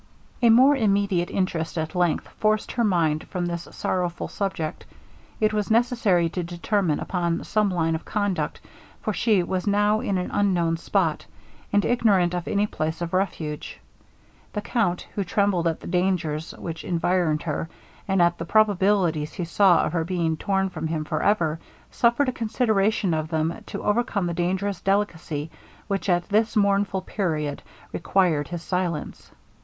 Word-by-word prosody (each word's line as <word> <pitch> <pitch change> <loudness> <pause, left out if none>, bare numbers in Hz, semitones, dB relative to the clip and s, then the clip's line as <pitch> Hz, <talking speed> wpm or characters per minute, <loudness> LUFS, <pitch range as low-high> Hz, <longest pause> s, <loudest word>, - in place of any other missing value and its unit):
A 235 - +5
more 260 +6 +7
immediate 200 -6 +1
interest 170 -3 -2
at 160 0 -2
length 175 -3 +1
forced 215 0 +1
her 240 - 0
mind 165 -7 +1
from 180 -2 -3
this 170 -1 -4
sorrowful 175 -2 -2
subject. 190 -6 -3 0.6
It 215 0 +2
was 210 -1 -1
necessary 225 -7 +3
to 180 - -3
determine 175 0 -1
upon 170 -2 -1
some 210 -1 +1
line 165 -3 0
of 160 - -3
conduct, 205 -3 -2 0.4
for 215 - -1
she 210 -3 +2
was 185 +2 -3
now 205 +1 +3
in 200 -3 -1
an 180 - -3
unknown 175 -5 +1
spot, 165 -3 0 0.4
and 205 0 +3
ignorant 200 -7 +3
of 175 -1 -3
any 205 0 +1
place 160 -5 -3
of 170 - -5
refuge. 165 -5 -2 0.7
The 210 - -2
count, 205 -5 -1
who 200 - -1
trembled 190 -2 +1
at 165 - -2
the - - -10
dangers 175 -4 -1
which 165 -1 -6
environed 170 -2 0
her, 160 0 -3 0.4
and 190 -3 +3
at 170 0 +2
the 170 - -3
probabilities 190 -6 +2
he 175 - -3
saw 175 0 +4
of - - -3
her 165 -2 +1
being 170 -2 -1
torn 195 +3 0
from 160 - -4
him 160 -1 -2
for - - -2
ever, 165 -6 +1 0.3
suffered 240 +3 +2
a - - +2
consideration 215 -5 +1
of 155 -1 -1
them 160 +1 -1
to - - -6
overcome 210 -3 +1
the 170 - -1
dangerous 185 +4 -1
delicacy 170 -6 -1 0.4
which 200 -1 -2
at 175 -1 +2
this 215 +2 +2
mournful 200 -2 +2
period 155 -8 -2 0.3
required 165 -5 +1
his 170 -1 -6
silence. 180 -4 -3
180 Hz, 160 wpm, -24 LUFS, 165-205 Hz, 0.7 s, more